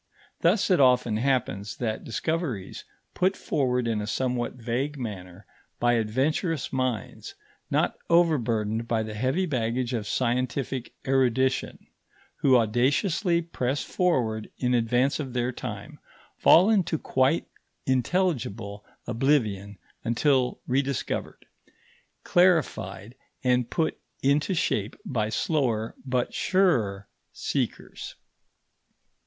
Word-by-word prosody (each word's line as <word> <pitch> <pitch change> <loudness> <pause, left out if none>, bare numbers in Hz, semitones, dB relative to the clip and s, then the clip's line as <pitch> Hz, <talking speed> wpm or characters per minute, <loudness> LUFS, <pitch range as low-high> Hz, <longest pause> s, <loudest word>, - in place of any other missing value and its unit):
Thus 190 +4 +2
it 180 - +4
often 125 -4 +4
happens 110 -6 -1
that 110 -3 -2
discoveries 130 - -3 0.3
put 185 +2 +1
forward 125 -4 0
in 110 -2 0
a 105 - -4
somewhat 125 +2 -1
vague 125 +5 -2
manner 95 -6 -7 0.3
by 120 0 +3
adventurous 135 - 0
minds 130 - -3 0.3
not - - 0
overburdened 115 -10 +2
by 115 -2 +1
the 110 0 -6
heavy 130 - 0
baggage 125 -3 -1
of 110 -4 -2
scientific 125 +2 -1
erudition, 130 0 +1 0.5
who 130 -2 +4
audaciously 150 - +2
press 140 -4 -2
forward 120 -12 0
in 125 -1 0
advance 120 +4 +2
of 135 -4 -4
their 125 0 0
time, - - -7 0.4
fall 185 +6 +6
into 190 -6 +2
quite 135 +3 +1 0.4
intelligible 125 - -1 0.2
oblivion 110 -6 0 0.3
until 125 +2 +1
rediscovered, 135 0 -2 0.8
clarified, 120 - +2 0.3
and 125 -2 +2
put 160 -2 -1 0.2
into 145 +7 +2
shape 105 - 0
by 110 -5 -1
slower 115 -4 0
but 125 -2 -1
surer 115 - +1 0.2
seekers. - - -4
125 Hz, 105 wpm, -26 LUFS, 115-145 Hz, 0.8 s, fall